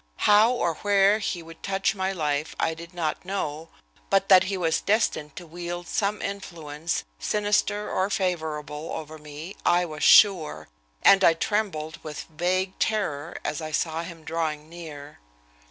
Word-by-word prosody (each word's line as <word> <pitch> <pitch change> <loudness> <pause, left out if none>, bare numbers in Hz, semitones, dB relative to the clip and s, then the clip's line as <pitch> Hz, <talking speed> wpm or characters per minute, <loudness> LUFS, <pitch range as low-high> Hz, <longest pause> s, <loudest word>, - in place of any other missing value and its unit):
How 210 +2 +6
or 175 -10 -1
where 205 +1 +4
he 180 -4 -3
would 165 0 -13
touch 195 +1 0
my 190 -1 -1
life 150 -4 -2
I 160 - +1
did 165 +1 -10
not 160 -3 -2
know, 165 -5 -4 0.4
but 195 0 +2
that 185 -2 +8
he 195 0 -2
was 165 -3 +1
destined 200 -8 0
to 180 - -8
wield 175 +1 -6
some 210 0 -1
influence, 165 -5 -4 0.2
sinister 210 0 0
or 190 +1 0
favorable, 160 -6 -2
over 155 0 -7
me, 150 +5 -9
I 175 +1 +3
was 155 -3 -6
sure, 160 - +5 0.3
and 195 0 +7
I 165 - +6
trembled 165 -6 -2
with 150 -1 -6
vague 185 +3 -1
terror 170 -7 -1
as 150 +2 -2
I 155 - -4
saw 160 +1 -1
him 170 -1 -9
drawing 155 -2 -3
near. 155 -4 -10
170 Hz, 155 wpm, -26 LUFS, 155-195 Hz, 0.4 s, that